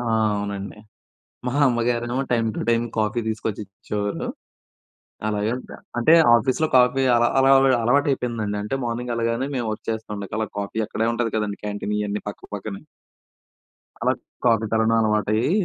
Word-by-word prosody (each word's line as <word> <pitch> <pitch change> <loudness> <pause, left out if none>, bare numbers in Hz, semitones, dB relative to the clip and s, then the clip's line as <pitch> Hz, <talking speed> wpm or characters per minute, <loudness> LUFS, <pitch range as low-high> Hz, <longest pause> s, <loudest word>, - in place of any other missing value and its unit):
ఆహ్, 110 -2 +1
అవునండి. 100 0 -4 0.7
మా 125 - -1
అమ్మగారేమో 120 0 0
టైమ్ 115 -2 +2
టు - - -3
టైమ్ 115 0 +3
కాఫీ 110 +2 +1
తీసుకొచ్చి 110 -1 -3
ఇచ్చేవాళ్ళు. 105 0 -4 1.0
అలాగే 105 +1 0 0.5
అంటే 120 +7 +4 0.2
ఆఫీస్‌లో 130 +7 +2
కాఫీ 125 +1 +4
అలా, 120 0 +4
అలా 135 0 +5 0.3
అలవాటు 140 +5 +3
అయిపోయిందండి. 115 -5 -2
అంటే 105 +6 -3
మార్నింగ్ 120 +1 -3
వెళ్ళగానే 115 +3 -1
మేము 120 -2 -1
వర్క్ 110 - -7
చేస్తాం 105 -2 -4
అలా 110 - 0
కాఫీ 100 +2 -4
అక్కడే 115 +2 -1
ఉంటుంది 115 -2 -1
కదండీ 105 -2 -2
క్యాంటీన్ 105 0 -3
ఇవన్నీ 105 0 -2
పక్కపక్కనే. 105 -1 -7 1.2
అలా - - +3 0.3
కాఫీ 115 -2 +3
తాగడం 110 0 +3
అలవాటయ్యి, 110 +3 +1
110 Hz, 140 wpm, -23 LUFS, 105-120 Hz, 1.2 s, అలా